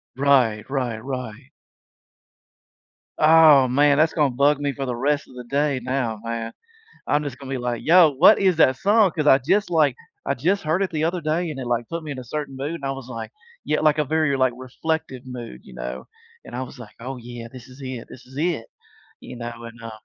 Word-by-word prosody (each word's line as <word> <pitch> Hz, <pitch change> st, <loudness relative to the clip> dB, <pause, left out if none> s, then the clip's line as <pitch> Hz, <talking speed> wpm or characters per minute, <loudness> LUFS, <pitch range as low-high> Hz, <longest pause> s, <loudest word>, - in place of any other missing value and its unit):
Right, 130 Hz, -6 st, +2 dB
right, 120 Hz, -5 st, -2 dB
right. 130 Hz, -1 st, -6 dB, 1.7 s
Oh, 155 Hz, -4 st, +7 dB
man. 140 Hz, +3 st, +3 dB
That's 155 Hz, +2 st, +3 dB
gonna 150 Hz, -4 st, +2 dB
bug 140 Hz, +3 st, +2 dB
me 145 Hz, -1 st, -1 dB
for 135 Hz, 0 st, -4 dB
the 125 Hz, -2 st, -3 dB
rest 145 Hz, +4 st, 0 dB
of 130 Hz, -, -16 dB
the 125 Hz, -, -7 dB
day 140 Hz, 0 st, 0 dB
now, 125 Hz, -4 st, -2 dB
man. 115 Hz, 0 st, -4 dB, 0.5 s
I'm 150 Hz, +1 st, +1 dB
just 135 Hz, -3 st, -6 dB
gonna 135 Hz, -1 st, -10 dB
be 135 Hz, -, -2 dB
like, 120 Hz, -1 st, -3 dB
"Yo. 170 Hz, 0 st, +7 dB
What 140 Hz, +5 st, +6 dB
is 185 Hz, -4 st, +2 dB
that 130 Hz, -4 st, +5 dB
song?" 205 Hz, -, +3 dB
'Cause 155 Hz, -, -1 dB
I 135 Hz, -2 st, +7 dB
just, 190 Hz, +10 st, +1 dB
like, 150 Hz, -6 st, +3 dB, 0.3 s
I -, -, +1 dB
just 180 Hz, +9 st, 0 dB
heard 160 Hz, +5 st, +1 dB
it 190 Hz, -, -3 dB
the 155 Hz, -1 st, -2 dB
other 175 Hz, +1 st, -1 dB
day, 160 Hz, +2 st, -1 dB
and 145 Hz, -, -6 dB
it, 130 Hz, -, -5 dB
like, 120 Hz, -1 st, -1 dB
put 165 Hz, 0 st, -4 dB
me 150 Hz, -, -6 dB
in 130 Hz, -, -5 dB
a -, -, -7 dB
certain 135 Hz, +1 st, -5 dB
mood 145 Hz, +5 st, -3 dB
and 140 Hz, -5 st, -7 dB
I 135 Hz, -, -1 dB
was 135 Hz, -2 st, -7 dB
like 115 Hz, -2 st, -6 dB, 0.3 s
Yeah, 150 Hz, -, +1 dB
like 155 Hz, -1 st, +3 dB
a 150 Hz, -, +1 dB
very, 155 Hz, -1 st, +1 dB
like, 130 Hz, -1 st, +2 dB
reflective 130 Hz, 0 st, -4 dB
mood, 120 Hz, -, -8 dB
you 65 Hz, -, -14 dB
know, 60 Hz, +1 st, -6 dB, 0.4 s
and 120 Hz, -, -10 dB
I 130 Hz, -, -3 dB
was 130 Hz, 0 st, -11 dB
like, 105 Hz, -3 st, -12 dB
"Oh, 130 Hz, +2 st, -6 dB
yeah. 120 Hz, -1 st, -9 dB
This 125 Hz, -2 st, -11 dB
is 130 Hz, +2 st, -15 dB
it. 130 Hz, -3 st, -6 dB
This 130 Hz, -, -13 dB
is 130 Hz, +1 st, -16 dB
it!" 160 Hz, -8 st, -1 dB, 0.5 s
you -, -, -10 dB
know, 120 Hz, 0 st, -7 dB
and, 115 Hz, 0 st, -11 dB
uh 115 Hz, -1 st, -7 dB
135 Hz, 225 wpm, -23 LUFS, 120-155 Hz, 1.7 s, Oh